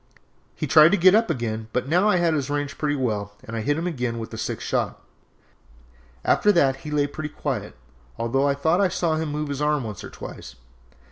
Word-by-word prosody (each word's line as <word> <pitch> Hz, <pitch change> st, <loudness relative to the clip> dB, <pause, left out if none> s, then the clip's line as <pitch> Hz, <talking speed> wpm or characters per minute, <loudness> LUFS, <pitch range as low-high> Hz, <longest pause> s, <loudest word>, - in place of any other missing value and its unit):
He -, -, -3 dB
tried 155 Hz, +2 st, +7 dB
to -, -, +4 dB
get 185 Hz, +2 st, +6 dB
up 225 Hz, -1 st, +3 dB
again, 110 Hz, -6 st, -2 dB
but 125 Hz, -, +1 dB
I -, -, -13 dB
now 180 Hz, +7 st, +3 dB
had 175 Hz, -4 st, +3 dB
his 145 Hz, -3 st, -1 dB
range 145 Hz, 0 st, -2 dB
pretty 150 Hz, -1 st, 0 dB
well 105 Hz, -6 st, -2 dB
and 115 Hz, -, -7 dB
hit 140 Hz, +7 st, 0 dB
him 165 Hz, -, -2 dB
again 125 Hz, -9 st, -2 dB
with 115 Hz, -1 st, -6 dB
the -, -, -7 dB
sixth -, -, -4 dB
shot; -, -, -1 dB, 1.3 s
after 210 Hz, -, +4 dB
that 135 Hz, -6 st, +3 dB
he 150 Hz, -, -9 dB
lay 150 Hz, -1 st, +1 dB
pretty 150 Hz, +1 st, -5 dB
quiet, 125 Hz, -, -4 dB, 0.4 s
although 135 Hz, +4 st, +1 dB
I 140 Hz, -, +2 dB
thought 160 Hz, +6 st, +2 dB
I 195 Hz, -, +4 dB
saw 170 Hz, -3 st, 0 dB
him 160 Hz, -1 st, -2 dB
move 150 Hz, 0 st, -3 dB
his 140 Hz, 0 st, -3 dB
arm 150 Hz, -2 st, +1 dB
once 105 Hz, -4 st, -7 dB
or -, -, -7 dB
twice. -, -, -10 dB
145 Hz, 215 wpm, -24 LUFS, 125-160 Hz, 1.3 s, tried